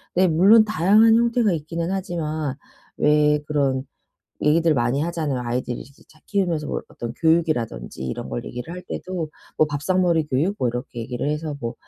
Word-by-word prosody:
네. 185 +1 +4
물론 195 +7 +6
다양한 215 +3 +5
형태가 235 -2 +2
있기는 165 +2 -3
하지만 160 -7 -3 0.4
왜 150 0 +3
그런 140 -3 0 0.6
얘기들 160 +2 +3
많이 125 +3 +1
하잖아요. 160 -5 -2
아이들 120 0 -2
이제 140 +2 -14
잘 155 - -22
키우면서 175 -7 0
뭐 - - -2
어떤 120 -1 -6
교육이라든지 130 - 0
이런 65 - -5
걸 - - -4
얘기를 125 +6 -7
할 180 - -7
때도 180 -4 -4 0.3
뭐 155 - +4
밥상머리 165 +2 +1
교육? 150 +9 0
뭐 125 - +1
이렇게 125 0 -5
얘기를 120 +3 -3
해서 150 0 -3
뭐 115 -2 -4
155 Hz, 365 characters per minute, -23 LUFS, 130-175 Hz, 0.6 s, 물론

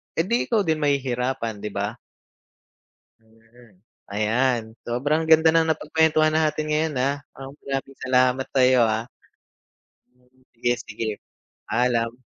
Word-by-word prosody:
eh, 165 - +2
di 235 +6 0
ikaw 220 -4 +2
din 160 -3 0
mahihirapan 125 -5 -1
'di 105 0 -5
ba? 100 +1 -1 1.3
Mm, 115 -2 -23 0.3
ayan. 115 +4 +1 0.2
Sobrang 145 +7 0
ganda 160 0 +6
ng 165 0 +3
napag-kuwentuhan 155 0 +2
natin 155 -1 +1
ngayon, 155 0 0
ah, 140 +2 +1 0.2
um, 135 +1 -9
maraming 135 0 -4
salamat 130 0 +2
sa'yo, 130 -2 +4
ah. 110 0 0 1.1
Hmm, 125 +1 -31
sige-sige. 115 -3 -3 0.5
Paalam. 120 0 0
130 Hz, 115 wpm, -23 LUFS, 115-150 Hz, 1.3 s, ganda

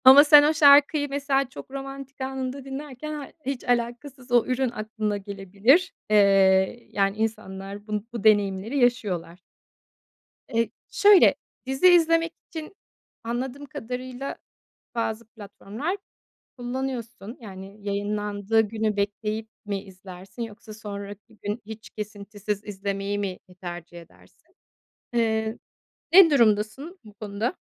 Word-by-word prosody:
ama 270 +3 +10
sen 295 -1 +9
o 300 +2 +3
şarkıyı 290 -1 +6
mesela 275 -1 0
çok 265 - -11
romantik 275 0 -8
anında 265 0 -4
dinlerken 285 +2 -6
ha 290 -2 -6 0.2
hiç 270 -2 -3
alakasız 245 +2 -2
o 240 -1 +5
ürün 255 0 0
aklına 215 -2 -3
gelebilir. 200 - +2 0.2
Eee, 195 +1 +4
yani 195 0 +1
insanlar 200 -2 -4
bu 210 -1 -3
bu 235 -4 -5
deneyimleri 205 +3 +3
yaşıyorlar. 200 -9 0 1.1
Eee, 230 0 +2 0.2
şöyle, 410 -2 +6 0.3
dizi 265 +7 +3
izlemek 330 -1 +4 0.2
için 320 +3 -7 0.5
anladığım 255 +4 -4
kadarıyla 255 +1 -6 0.6
bazı 230 0 -2
platformlar 225 - -5 0.6
kullanıyorsun. 245 -3 -5
Yani 195 -1 -10
yayınlandığı 205 +1 0
günü 220 0 -1
bekleyip 210 +2 -2 0.2
mi 200 -1 -2
izlersin 190 +2 -11
yoksa 225 -1 -8
sonraki 205 0 -9
gün 210 +3 -3
hiç 220 0 -9
kesintisiz 205 -1 -5
izlemeyi 200 0 -3
mi 195 -2 -3 0.2
tercih 175 -1 -7
edersin? 170 - -22 0.6
Eee, 220 -1 0 0.6
ne 360 -2 +9
durumdasın 235 - +2
bu 210 -1 -14
konuda? 210 - -3
225 Hz, 115 wpm, -25 LUFS, 205-265 Hz, 1.1 s, ama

